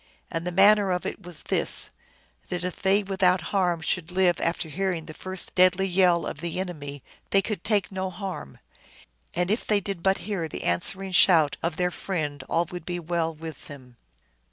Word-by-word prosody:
And 165 +1 -3
the - - -1
manner 200 +2 +5
of 180 0 -1
it - - -5
was 175 -3 -9
this: - - +3 0.6
that 180 0 -3
if 180 -1 -5
they 195 +2 +3
without 190 -2 +2
harm 175 -4 +1
should 170 +1 -1
live 180 -2 +2
after 170 0 -1
hearing 175 0 -2
the 155 - -9
first 185 +1 -4
deadly 185 +1 +4
yell 180 -2 +3
of - - -5
the 170 +1 -3
enemy 145 -7 -6 0.3
they 195 0 +3
could 210 -6 -4
take 205 -3 +1
no 190 0 -3
harm, 180 - -7 0.8
and 180 +2 0
if 220 - 0
they 210 -1 +2
did 195 -3 -5
but 190 +2 +2
hear 195 -6 -2
the - - -7
answering 190 - 0
shout 165 -5 +5
of 165 -1 -1
their 180 0 +1
friend 150 -8 -3
all 170 +1 +2
would 175 -2 -6
be 175 +1 -4
well 170 -1 -1
with 160 0 -9
them. 130 -5 -12
180 Hz, 190 wpm, -26 LUFS, 165-190 Hz, 0.8 s, manner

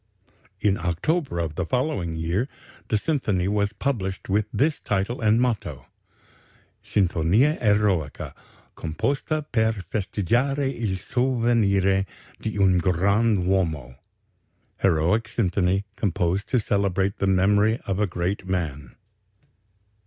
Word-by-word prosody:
In 100 -2 +1
October 100 - -1
of 85 -3 -2
the 90 - -2
following 125 - -1
year 85 +9 -1 0.4
the 110 - +1
symphony 105 - 0
was 100 0 +1
published 100 -7 -3
with 105 +2 +1
this 150 +3 +1
title 100 +5 -2
and 110 +1 +4
motto: 120 -4 -1 1.0
Sinfonia 100 - +2
Eroica.... 105 - +1 0.4
Composta 140 - -2
per 110 -1 +2 0.2
festeggiare 120 - 0
il 105 -5 -2
Sovvenire 110 -6 +1 0.3
di 110 -1 -3
un 95 -2 +4
grand 100 +3 +2
Uomo 80 -9 0 0.9
("Heroic 95 +6 +2
Symphony.... 100 -4 +1
Composed 95 0 -1
to 125 - +2
celebrate 100 -2 0
the 100 - +1
memory 100 +4 +3
of 95 0 -2
a 105 - +2
great 90 +2 -3
man.") 75 -8 -3
100 Hz, 110 wpm, -24 LUFS, 90-115 Hz, 1.0 s, and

